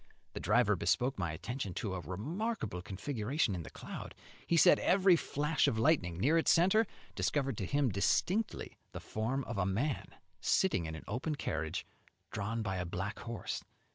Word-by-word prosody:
The - - -4
driver - - +3
bespoke 130 0 +1
my 85 -4 -1
attention 100 - -4
to 100 -4 -2
a 95 - -2
remarkable 110 - -3
configuration 110 - -1
in 90 - -3
the - - -8
cloud; - - -8 0.3
he 170 - +3
said 155 - +7
every 190 -1 +5
flash 150 -1 +1
of 110 - +1
lightning 110 - +2
near 150 - +4
its - - +2
centre 190 +6 +5 0.3
discovered 135 -4 0
to 95 - -2
him 140 -2 +2
distinctly 180 - 0
the - - -5
form 120 +6 -2
of 120 -5 -4
a 90 - +2
man 130 +10 -1 0.3
sitting 155 - +2
in 80 - -5
an 80 - -8
open 130 +9 -2
carriage 80 - -3 0.5
drawn 110 +3 -2
by 95 -3 -2
a 90 - -2
black 95 +5 -4
horse. 115 -2 -4
115 Hz, 170 wpm, -33 LUFS, 95-155 Hz, 0.5 s, said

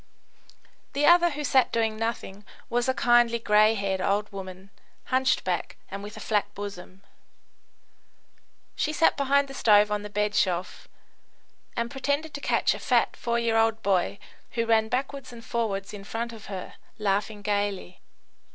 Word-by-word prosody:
The 285 +1 +1
other, 345 0 +6
who 295 -1 -5
sat 260 -2 +3
doing 225 -1 0
nothing, 215 -3 -4 0.3
was 245 +1 +1
a - - +3
kindly, 240 -1 +4
grey 215 -1 +4
haired 195 -2 -1
old 205 +2 0
woman, 190 0 -9 0.4
hunchbacked 260 -9 0 0.2
and 195 +1 -5
with 205 +1 -9
a - - -7
flat 210 -2 0
bosom. 195 -1 -8 1.7
She 305 - -1
sat 325 - +3
behind 280 0 +2
the 270 - -9
stove 210 -4 +4
on 210 0 0
the 210 - -7
bedshelf, 205 -3 -1 0.9
and 235 0 -1
pretended 285 +3 -2
to 285 - -6
catch - - +2
a - - -7
fat - - +2
four 235 0 -1
year 230 -1 +1
old 225 0 +2
boy, 190 0 +1 0.4
who 230 -1 0
ran 220 -1 +3
backwards 265 +2 -3
and 230 -1 -11
forwards 200 -4 -2
in 200 -1 -8
front 230 +3 -4
of 220 -2 -11
her, 190 -2 -6 0.2
laughing 205 0 -1
gaily. 205 -3 -2
220 Hz, 155 wpm, -26 LUFS, 200-240 Hz, 1.7 s, other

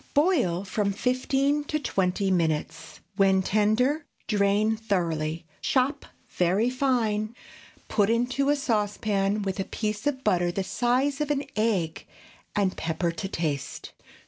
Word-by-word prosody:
Boil 275 - +2
from 200 +1 0
fifteen 270 +5 +1
to 305 - -1
twenty 190 -7 0
minutes. 160 -4 -1 0.2
When 190 -1 +4
tender, 230 +10 +2 0.2
drain 210 +1 +2
thoroughly, 165 -7 -1 0.2
chop 265 +2 +1 0.2
very 190 +7 +1
fine; 235 -5 0 0.5
put 205 -1 +2
into 250 +4 +1
a 290 - +4
saucepan 210 -5 0
with 195 0 -3
a - - +1
piece 215 +4 -3
of 270 -2 -1
butter 175 -1 +2
the 190 +2 -2
size 255 +7 0
of 300 - -1
an 290 -1 0
egg, 200 -7 0 0.5
and 195 -2 +1
pepper 165 +1 -1
to 180 +4 -5
taste. 155 -7 -3
210 Hz, 130 wpm, -26 LUFS, 190-255 Hz, 0.5 s, When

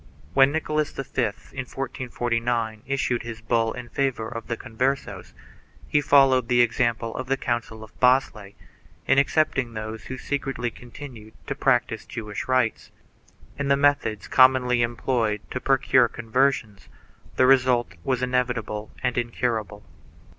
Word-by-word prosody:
When 135 0 +5
Nicholas 155 -1 -1
V, - - -6 0.2
in 120 - +3 0.4
1449, 120 -3 -2
issued 135 -3 0
his 115 -1 -7
bull 115 0 +1
in 125 -1 -8
favor 125 -3 -1
of 115 -1 -7
the 115 - -3
Converses, 130 +5 -3 0.5
he 145 - +2
followed 135 -4 +4
the 120 0 +4
example 120 -1 0
of 130 - -4
the 135 +1 +1
council 115 -3 -3
of 110 - -16
Basle, 125 -6 +2 0.5
in 135 - +4
excepting 140 -4 +1
those 110 0 -6
who 130 - -6
secretly 135 -4 -3
continued 120 -3 -11
to - - -3
practise 125 -5 +1
Jewish 105 -3 -6
rites. 130 -3 0 0.7
In 140 - -1
the 140 0 +3
methods 140 -9 +1
com 130 0 +7
monly 125 -1 +1
employed 115 -2 -1
to 130 - -3
procure 135 -2 +3
conversions 115 -3 -1 0.5
the 130 - +4
result 130 -5 +3
was 130 +2 -1
inevitable 125 -4 -1
and - - +1
incurable. 115 -3 -2
120 Hz, 140 wpm, -24 LUFS, 115-130 Hz, 0.7 s, com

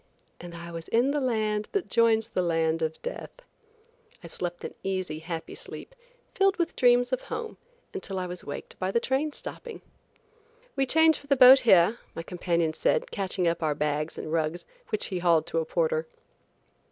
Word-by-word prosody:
–" - - -40
and 175 -1 -9
I 170 0 -8
was 165 -1 -7
in 245 +4 +2
the 295 0 -1
land 215 -4 0
that 400 -3 -1
joins 225 -1 +3
the 185 - -1
land 165 -2 0
of 160 0 -2
death. - - -7 0.8
I - - -8
slept 175 -1 -5
an - - -6
easy, 185 -5 -3
happy 165 0 -6
sleep, - - -8 0.4
filled 390 0 +2
with 340 -1 -1
dreams 245 0 +3
of 255 - 0
home 460 -2 -6 0.4
until 205 - -5
I 185 - -2
was 180 0 -6
waked 145 - -8
by 185 - -1
the 235 - +2
train 270 +5 -1
stopping. 470 +9 -8 0.9
"We 270 -1 +1
change 320 +2 +4
for 285 - -18
the 280 - +3
boat 260 +1 +9
here," 210 -1 +5 0.2
my 165 - -5
companion 170 -2 -1
said - - 0
catching 190 -2 -1
up 170 +1 0
our 155 -2 0
bags 150 +1 -2
and 155 - -6
rugs, 165 +1 -1 0.2
which 215 - 0
he 185 - -3
hauled 170 -3 +3
to 165 - -1
a 160 - -2
porter. 475 - 0
195 Hz, 190 wpm, -27 LUFS, 170-265 Hz, 0.9 s, boat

